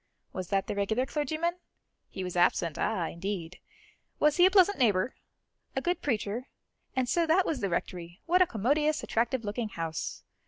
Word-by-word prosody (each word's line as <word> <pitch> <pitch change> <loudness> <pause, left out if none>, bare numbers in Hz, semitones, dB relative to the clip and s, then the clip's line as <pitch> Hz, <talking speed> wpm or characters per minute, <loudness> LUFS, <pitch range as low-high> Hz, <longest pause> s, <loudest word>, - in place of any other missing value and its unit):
Was 185 -1 -4
that 195 0 +1
the - - -3
regular 220 +5 0
clergyman? 310 +5 -1 0.5
He 190 - -5
was 180 -1 -5
absent; 175 -2 +2
ah, 185 -7 0
indeed! 180 -1 -5 0.6
Was 300 +1 +3
he 355 +1 +8
a - - +4
pleasant 385 -1 +4
neighbour? 210 -2 +2 0.6
a - - +2
good 355 +1 -1
preacher? 230 -1 -2 0.5
And 260 -1 +1
so 335 +5 +2
that 360 +4 +4
was 305 -5 -1
the 200 - -1
Rectory; 175 +1 -4
what 360 +2 +4
a 365 - +6
commodious, 295 +8 +1
attractive 235 +1 0
looking 215 +2 -2
house! 165 -4 -4
230 Hz, 170 wpm, -29 LUFS, 185-305 Hz, 0.6 s, he